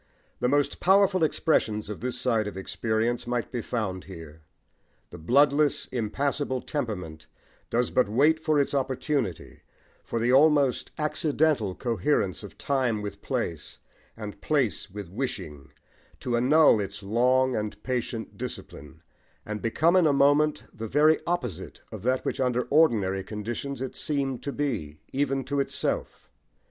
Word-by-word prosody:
The 125 - +1
most 145 +1 +1
powerful 190 -1 +4
expressions 110 -9 +1
of 105 - -6
this 125 +2 -1
side 115 -4 +1
of 100 - -6
experience 110 +5 -1
might 120 -1 -2
be 120 -3 -2
found 100 -6 -3
here. 80 -4 -11 0.7
The 85 - -9
bloodless, 140 - +3
impassible 130 +3 -1
temperament 90 - -4 0.4
does 120 +1 0
but 125 -5 +2
wait 150 +8 +3
for 155 -1 +1
its 140 - 0
opportunity, 130 - -2 0.4
for - - -4
the 120 +2 +2
almost 145 -2 +4
accidental 150 - +1
coherence 115 -4 0
of 100 -5 -11
time 125 -6 0
with 105 - -6
place, 80 -4 -3 0.4
and 105 -2 -8
place 125 - 0
with 100 0 -7
wishing, 80 - -5 0.5
to 125 -2 -1
annul 135 +1 +5
its 100 +1 -5
long 125 +5 +2
and 105 -1 -4
patient 120 -3 -3
discipline, 80 +3 -8 0.4
and 105 0 -5
become 155 +10 +2
in 180 -3 +5
a - - +4
moment 145 +2 +3
the 110 +1 -6
very 150 +6 +4
opposite 125 - -3
of 110 -4 -7
that 130 +4 0
which - - -2
under 125 -1 +1
ordinary 105 -11 +3
conditions 115 +7 -5
it 130 - -6
seemed 135 -4 -1
to 140 - -4
be, 110 - -3 0.2
even 135 0 0
to 140 +1 -2
itself. 140 - -3
125 Hz, 145 wpm, -27 LUFS, 105-140 Hz, 0.7 s, annul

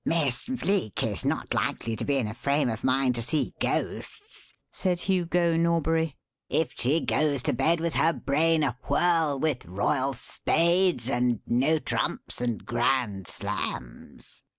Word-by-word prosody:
"Miss 150 - 0
Bleek 200 - -1
is - - -2
not - - -1
likely 115 -1 -1
to - - -4
be 140 -1 +2
in 125 -5 0
a 105 - -5
frame 140 +2 0
of 110 - -6
mind 130 0 +2
to 120 - -4
see 150 +6 -1
ghosts," 415 +1 -3 0.2
said 180 -2 -1
Hugo 175 -2 +1
Norbury, 165 -2 +1 0.3
"if 160 - 0
she 145 +7 +1
goes 145 -4 +1
to - - +1
bed 160 +7 +2
with 165 0 -1
her 165 - +3
brain 155 +2 +1
awhirl 150 +3 +1
with 150 -4 0
royal 130 - -1
spades 170 +1 +1
and 120 -3 +1
no 135 +7 +2
trumps 150 - -2
and 120 -3 -2
grand 120 -5 0
slams." 60 -1 -6
145 Hz, 150 wpm, -27 LUFS, 125-165 Hz, 0.3 s, her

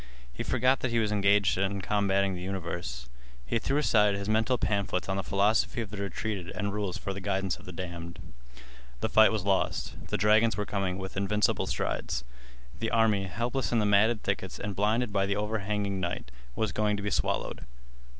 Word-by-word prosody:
He - - -6
forgot 130 +1 +2
that 130 - -1
he 115 - 0
was 110 -2 +1
engaged 100 -2 +3
in 100 +1 0
combating 100 -1 +1
the 90 - -5
universe. 85 -9 -4 0.4
He 115 - 0
threw 135 +5 0
aside 105 -8 +4
his 100 0 -4
mental 110 +4 +2
pamphlets 100 -4 -1
on 95 - -1
the 95 - 0
philosophy 100 +5 +1
of 110 -4 -4
the 105 - -6
retreated 100 -2 -3
and 100 -1 -2
rules 100 -3 -2
for 100 - -4
the 100 - -7
guidance 95 -2 -1
of - - -15
the 90 - -7
damned. 85 -1 -6 0.8
The - - 0
fight 110 0 +6
was 105 -4 -2
lost. 100 -1 -1
The - - -1
dragons 110 +3 +4
were 105 - -1
coming 95 -3 -2
with 95 -1 -6
invincible 105 +1 +1
strides. - - -2 0.6
The 115 - -1
army, 110 -3 +3
helpless 120 +7 -2
in 120 - +2
the 105 - +2
matted 105 +2 +3
thickets - - -2
and 100 -1 -4
blinded 110 +2 +1
by 100 -1 +2
the 100 - 0
overhanging 105 -1 -1
night, 85 -9 -3 0.2
was 110 - 0
going 105 -1 +1
to 100 - -5
be 100 - -1
swallowed. - - -1
100 Hz, 195 wpm, -29 LUFS, 95-110 Hz, 0.8 s, fight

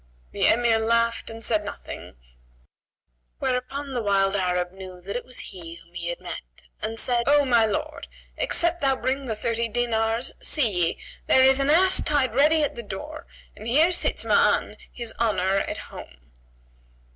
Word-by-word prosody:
The - - +1
Emir 230 -1 +3
laughed 230 +1 +1
and 225 0 -9
said 215 -2 +1
nothing; 205 - -8 1.2
whereupon 265 +2 -3
the 245 - -1
wild 195 -2 +2
Arab 180 -2 0
knew 185 -1 -10
that 195 +3 -7
it 245 - -3
was 255 - -5
he 170 -3 -8
whom 170 0 -18
he 170 -1 -5
had 175 - -4
met - - -9 0.2
and 225 +1 -3
said, 240 -1 +2
"O 290 0 +5
my 235 -4 +4
lord, 210 - -4 0.3
except 345 -9 +1
thou 270 -1 +3
bring 265 +2 -2
the 220 - -2
thirty 230 +2 -1
dinars, 230 0 -1
see 285 -8 +1 0.2
ye, - - -4 0.3
there 260 - +5
is 265 +1 +5
the 275 +1 +2
ass 370 +4 +5
tied 275 -6 +1
ready 300 +4 +4
at 290 - -1
the 235 - -6
door 235 +9 -8 0.3
and 220 - -9
here 310 +9 +4
sits 350 - 0
Ma'an, - - +2 0.2
his 235 -2 -4
honour, 195 -4 +1
at - - -2
home." - - -12
230 Hz, 170 wpm, -24 LUFS, 195-270 Hz, 1.2 s, O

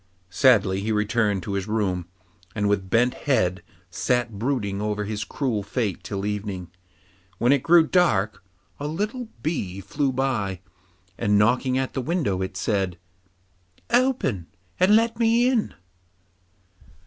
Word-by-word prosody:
Sadly 100 -4 +4
he 110 +2 -2
returned 105 -2 +1
to 100 - -4
his 100 0 -2
room, 95 -5 -1 0.5
and 105 -1 0
with 100 -2 0
bent 120 +4 +3
head 95 -10 0 0.3
sat 120 +1 -1
brooding 110 -6 -1
over 105 0 -1
his 105 0 -3
cruel 120 -6 -2
fate 100 -1 -3
till 100 -1 -4
evening. 100 -4 -4 0.7
When 120 +6 +3
it 140 -2 +3
grew 170 +1 +5
dark, 110 - +1 0.4
a 145 - -3
little 215 - -3 0.2
bee 100 - -2
flew 140 +7 -1
by, 120 -8 -1 0.6
and 105 0 +2
knocking 125 +5 +2
at 130 0 -2
the 135 - -2
window, 125 - -1
it 95 0 -4
said, 95 -5 -1 0.9
'Open, 235 - +1 0.3
and 190 +3 +5
let 230 +1 +2
me 235 +1 +4
in. 250 -4 0
110 Hz, 135 wpm, -24 LUFS, 100-140 Hz, 0.9 s, grew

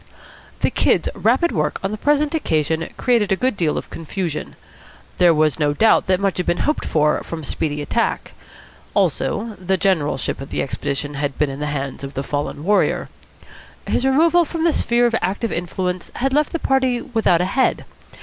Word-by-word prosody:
The - - +2
Kid's - - +2
rapid 345 - +2
work 150 -2 -1
on 195 - -1
the - - -2
present 295 +6 +1
occasion 160 - 0
created 235 -5 +2
a - - +4
good 255 +3 0
deal 165 -5 0
of - - -6
confusion. 165 -1 -4 0.6
There 175 -1 +6
was 155 -1 +2
no 145 -1 +2
doubt 220 +8 +3
that 185 -1 +2
much 195 -1 0
had 180 - -2
been 175 - +1
hoped 300 - 0
for 150 -1 +2
from 165 -2 -6
speedy 150 +1 -2
attack. 230 +10 -1 0.6
Also, 220 0 0
the 190 +1 +1
generalship 165 -9 0
of 135 - -8
the - - -1
expedition 140 +1 -3
had 140 -1 -3
been 150 -2 +1
in 135 - -7
the 150 - -2
hands 140 -2 -4
of 135 0 -7
the 135 - -2
fallen 145 +1 -3
warrior. 205 +4 +1 0.8
His - - 0
removal 325 +6 +4
from 330 +1 -4
the 335 -2 +3
sphere 240 -2 +2
of 235 - +1
active 205 +4 -1
influence 180 +1 -3
had 265 +2 0
left 300 +1 +2
the 335 - -1
party 260 -5 +1
without 225 -8 +1
a 180 - +1
head. 255 +8 +1
185 Hz, 190 wpm, -20 LUFS, 150-245 Hz, 0.8 s, There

